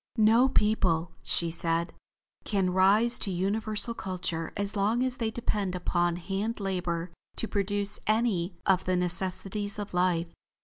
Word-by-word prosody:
"No 225 +4 +5
people," 180 -8 +1
she 170 -1 0
said, 165 +1 -1 0.5
"can 195 -3 0
rise 205 +6 +5
to - - +1
universal 210 +5 0
culture 180 -5 -3
as 200 +1 +1
long 215 +5 +1
as 255 -1 -2
they 225 -2 -1
depend 210 -5 -2
upon 175 -1 0
hand 195 +6 -3
labor 180 -3 -2 0.2
to 225 - -1
produce 205 0 0
any 210 -5 +1
of 185 -1 +3
the 185 - +1
necessities 190 +3 -3
of 205 -2 -6
life. 180 -2 +1
195 Hz, 140 wpm, -28 LUFS, 180-215 Hz, 0.5 s, No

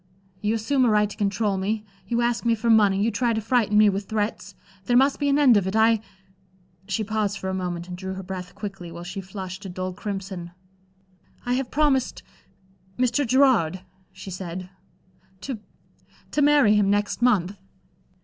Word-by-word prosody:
You 210 +2 +1
assume 255 +5 +1
a 245 - +4
right 210 -1 +3
to 205 - -10
control 205 -1 0
me, 210 +3 -2 0.2
you 235 +3 0
ask 235 0 0
me 230 -1 +2
for 230 +1 +1
money, 205 -3 +4
you 230 - +1
try 235 +2 +1
to 220 - 0
frighten 220 -2 +1
me 215 0 +7
with 200 0 0
threats. 215 0 -3 0.3
There 245 -1 +3
must 270 +2 +3
be 285 -1 +1
an 280 - +3
end 265 -7 +6
of 195 -2 0
it. 190 - -2
I" 220 0 +4 0.9
she 215 +2 -1
paused 210 -1 -1
for 190 - -4
a - - -2
moment, 175 -2 -3
and 180 - -6
drew 190 +1 -6
her 190 - -6
breath 180 0 -7
quickly, 195 -4 -7
while 170 +1 -8
she 185 +3 -6
flushed 190 0 -7
a 195 - -6
dull 185 +1 -4
crimson. 190 -3 -6 0.9
"I 245 - 0
have 255 0 -1
promised 285 -3 +1 0.7
Mr. 250 +2 +1
Gerard," 230 - +3 0.3
she 190 +1 -10
said 180 0 -6 0.7
"to 260 -5 -5 0.7
to 295 - +1
marry 290 -7 +5
him 205 -2 +3
next 205 +3 0
month." 205 -5 +2
210 Hz, 185 wpm, -24 LUFS, 190-235 Hz, 0.9 s, me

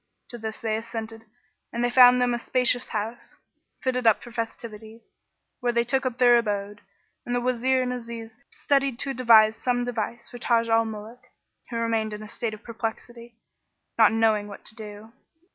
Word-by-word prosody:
To 240 - -8
this 220 0 -5
they 220 -1 -2
assented 225 0 -7 0.5
and 235 +1 -2
they 245 - +2
found 250 0 +7
them 245 -1 +2
a 240 - -1
spacious 250 0 +2
house, 220 +2 -5 0.5
fitted 250 -2 0
up 220 - +4
for 240 - -11
festivities, 225 -1 -7 0.5
where 245 -1 0
they 235 0 +2
took 265 +2 0
up 250 -2 -4
their 245 -1 +6
abode, 205 -2 -3 0.4
and 245 - -3
the - - +2
Wazir 255 +1 +1
and 250 0 -2
Aziz 230 -2 -8
studied 275 -3 0
to 275 +1 -2
devise 220 -3 +5
some 245 -1 0
device 235 0 -4
for 245 - -9
Taj 230 -2 +1
al 225 0 +3
Muluk, 220 +2 -9 0.4
who 235 - -6
remained 225 -2 -1
in 210 0 -7
a - - -9
state 220 0 -4
of 215 - -18
perplexity, 230 +1 -6 0.6
knowing 220 -1 +3
not - - -11
what 200 - -11
to - - -6
do. 215 +1 -10
230 Hz, 180 wpm, -25 LUFS, 220-245 Hz, 0.6 s, found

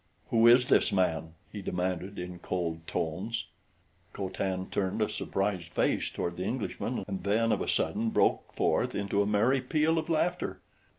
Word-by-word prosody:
"Who 115 0 +5
is 125 +1 +7
this - - +4
man?" 80 -4 0 0.2
he 105 - -6
demanded 90 +1 -2
in 90 0 -6
cold 85 -3 -3
tones. 95 +9 -2 0.7
Co 95 -2 -3
Tan 95 0 -2
turned 95 -2 -1
a - - +2
surprised 95 -4 -2
face - - +1
toward 85 0 -3
the 90 - -2
Englishman 120 +2 -3
and 95 -3 -4
then 110 +3 +2
of - - +1
a - - -2
sudden 110 +2 +1
broke - - +2
forth - - +1
into 100 0 +1
a 100 - +1
merry 115 +6 +3
peal 155 +5 +2
of 160 - -5
laughter. 165 - 0
100 Hz, 170 wpm, -30 LUFS, 90-115 Hz, 0.7 s, is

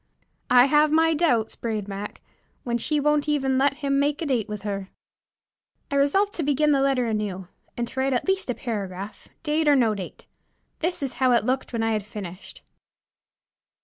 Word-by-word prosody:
"I 245 0 +7
have 295 +2 +4
my 325 +1 +4
doubts," 290 -9 +1
brayed 215 -3 -3
Mac, 200 +1 -6 0.4
"when 240 -1 -1
she 300 +5 0
won't 295 0 +1
even 270 -3 +1
let 280 +1 +3
him 275 0 +2
make 290 +1 +1
a - - -2
date 245 -7 0
with 210 -1 -6
her." 200 -2 -4 1.0
I - - 0
resolved 390 +9 +2
to - - -3
begin 295 +1 +2
the 275 -2 +3
letter 270 -2 +2
anew, 205 -5 -3 0.3
and 240 0 -1
to 265 - -6
write 265 0 +1
at 245 - -1
least 385 -6 0
a 245 - 0
paragraph, 200 -4 -5 0.2
date 310 0 0
or 290 - +6
no 235 -5 +3
date. 195 -3 -8 0.5
This 345 -2 -1
is 270 - -3
how 255 -1 +5
it 235 - +2
looked 260 +2 -1
when 230 -2 -1
I 225 - +1
had 215 -2 -1
finished. 195 -3 -9
260 Hz, 190 wpm, -24 LUFS, 215-295 Hz, 1.0 s, I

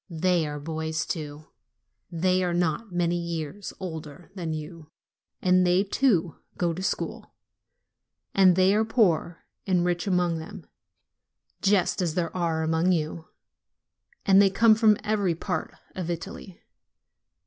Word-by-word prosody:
They 170 -1 +1
are 145 0 -5
boys 160 +1 -3
to; 150 -2 -8 0.7
they 185 +2 +1
are 175 -1 0
not 175 +5 -1
many 175 0 0
years 170 +3 -5
older 160 -3 -8
than 175 -5 -4
you; 155 0 -7 0.5
and 185 0 +4
they, 180 +2 +3
too, 195 - +1 0.2
go 175 -2 0
to 180 - -6
school; 200 - -4 1.0
and 185 -2 +5
there 190 +3 +4
are - - +3
poor 180 -7 +1 0.2
and 180 -2 +2
rich 175 +2 -1
among 180 -3 +1
them, 160 - -9 1.0
just 195 -2 +2
as 170 -3 -1
there 175 -1 -2
are 165 -3 0
among 160 +3 +2
you, 160 -1 -2 1.0
and 195 0 +6
they 200 - +5
come 225 +3 +5
from 215 -1 +4
every 205 -5 0
part - - -3 0.2
of 180 -2 -5
Italy. 185 +2 -7
175 Hz, 135 wpm, -26 LUFS, 160-190 Hz, 1.0 s, and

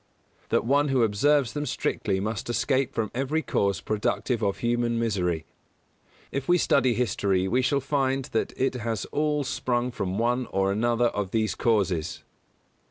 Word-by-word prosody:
That - - +1
one 140 +4 +3
who 135 -3 +2
observes 120 +4 +2
them 150 0 -3
strictly 95 -3 -1
must 110 +2 -3
escape 130 +3 +1
from 110 -2 -1
every 135 +6 -1
cause 100 -4 0
productive 110 +2 -1
of 100 -2 0
human 120 0 0
misery. 90 -8 -1 0.9
If 135 -1 -3
we 175 - +6
study 130 -7 +3
history 95 -5 +1
we 125 +6 +2
shall 140 +2 +1
find 135 -1 0
that 110 - 0
it 135 0 +1
has 115 -4 -3
all 150 -1 0
sprung 125 -1 -1
from 95 -5 -3
one 120 +2 0
or 95 0 0
another 120 +3 +2
of 105 -4 -3
these 110 +1 0
causes. 100 -8 0
120 Hz, 160 wpm, -26 LUFS, 105-135 Hz, 0.9 s, we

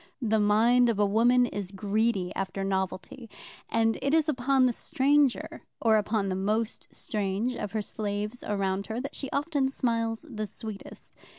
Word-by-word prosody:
The 220 -4 +1
mind 230 +4 +4
of 225 - 0
a 205 - +3
woman 240 +5 +4
is 205 -5 -4
greedy 200 -1 0
after 195 0 -3
novelty, 190 +4 -3 0.4
and 225 0 +1
it 280 +3 +2
is 320 -1 +3
upon 265 -2 +2
the 250 - +2
stranger, 280 +2 +1 0.2
or 220 -2 +4
upon 210 -1 0
the 190 - -1
most 215 +4 -1
strange 215 - -2
of 210 -3 -5
her 215 -1 -1
slaves 210 +2 -4
around 195 -1 -1
her, 225 +2 -3
that 275 +2 -5
she 270 - -5
often 285 -1 0
smiles 230 -2 -1
the 215 -6 -4
sweetest. 215 -1 -9
220 Hz, 165 wpm, -28 LUFS, 205-250 Hz, 0.4 s, mind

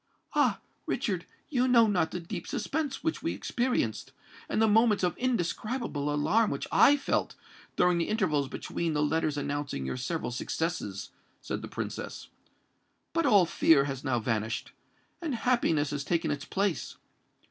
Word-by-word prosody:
"Ah! - - +3 0.3
Richard, - - -1 0.2
you 255 -2 +2
know 235 -2 +6
not 190 -6 +1
the 180 - -4
deep 170 0 -6
suspense 285 +5 -2
which 320 -1 -1
we - - -1
experienced, 240 - -1 0.4
and - - 0
the 220 - +5
moments 220 -1 +4
of 175 -2 +1
indescribable 230 - -1
alarm 175 +10 +2
which - - -3
I 290 - +6
felt, 280 - -1 0.4
during 180 -1 +3
the 170 - 0
intervals 155 -10 +1
between 165 +4 -3
the 150 0 +1
letters 155 0 0
announcing 145 - -3
your 65 - -3
several 145 +2 -3
successes," 120 - -3 0.3
said - - -4
the - - -6
Princess. - - -6 0.8
"But 330 0 +2
all 200 -4 +6
fear 160 -3 +4
has 135 -2 -4
now 130 -3 +1
vanished—and 115 - -4
happiness 225 - +1
has 145 -1 -2
taken 170 +2 0
its 145 0 -3
place. 195 -7 -1
170 Hz, 150 wpm, -29 LUFS, 145-225 Hz, 0.8 s, know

